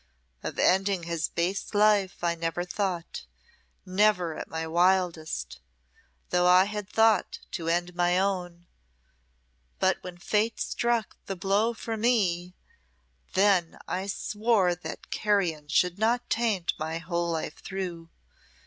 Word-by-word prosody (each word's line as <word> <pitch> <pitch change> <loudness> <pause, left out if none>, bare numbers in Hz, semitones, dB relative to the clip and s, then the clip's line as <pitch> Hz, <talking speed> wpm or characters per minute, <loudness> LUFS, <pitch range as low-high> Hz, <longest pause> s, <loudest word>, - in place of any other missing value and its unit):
Of - - -5
ending 190 -1 +2
his 170 -2 -1
base 185 +5 -2
life 205 -4 +3
I 170 -1 +2
never 165 +1 -2
thought, 180 -2 -3 0.6
never 185 -3 +2
at - - -6
my 160 0 -4
wildest, 165 - +1 0.7
though 180 0 +3
I 180 +1 +7
had 210 0 -5
thought 220 -2 +3
to 165 -2 -3
end 175 +1 0
my 175 0 +2
own; 180 -3 -1 1.1
but 190 0 +2
when 180 -1 -8
Fate 210 +5 0
struck 235 -3 -1
the 195 - -3
blow 200 +6 +1
for 225 0 -4
me, 185 -6 +1 0.8
then 190 -4 +3
I 190 +2 -3
swore 210 -2 +1
that 175 - -8
carrion 180 -8 0
should 180 +5 +1
not 235 +3 +1
taint 220 -7 +1
my 160 +1 -2
whole 170 +1 -2
life 165 -1 -3
through. 180 -4 -5
180 Hz, 130 wpm, -27 LUFS, 170-205 Hz, 1.1 s, I